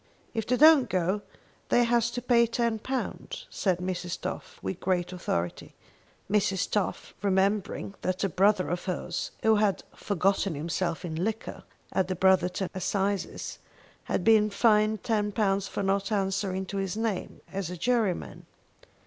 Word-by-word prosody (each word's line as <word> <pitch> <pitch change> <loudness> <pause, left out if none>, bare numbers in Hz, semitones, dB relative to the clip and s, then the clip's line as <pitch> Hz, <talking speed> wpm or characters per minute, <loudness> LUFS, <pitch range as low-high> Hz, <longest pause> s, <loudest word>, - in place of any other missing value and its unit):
"If 225 -2 -2
they 250 - +2
don't 305 -4 +7
go 185 +2 0 0.5
they 245 - +5
has 235 0 +2
to 245 0 -5
pay 235 -2 +4
£10," 235 - -2
said 185 -4 +1
Mrs. 180 -1 -3
Toff - - -6
with 95 - -3
great 180 -1 0
authority, 90 - -3 0.5
Mrs. 195 -2 +1
Toff 205 -3 -1
remembering 195 0 0
that 185 +1 -1
a 195 - +2
brother 195 +2 +3
of 175 +1 -3
hers, 180 -2 -3
who 220 -1 +5
had 205 -2 +1
"forgotten 195 -2 0
himself 170 +3 -2
in 165 0 -3
liquor" 220 +2 -4 0.3
at 190 - +1
the 185 - -2
Brotherton 185 0 +2
assizes, 195 +1 -2 0.5
had - - -1
been 215 0 +5
fined 215 0 +3
£10 205 -3 0
for - - -3
not 195 +1 0
answering 195 -1 0
to 200 - -5
his 195 0 -2
name 220 -4 -2
as 195 -3 -3
a 180 - -6
juryman. 225 -1 -1
195 Hz, 145 wpm, -28 LUFS, 185-220 Hz, 0.5 s, don't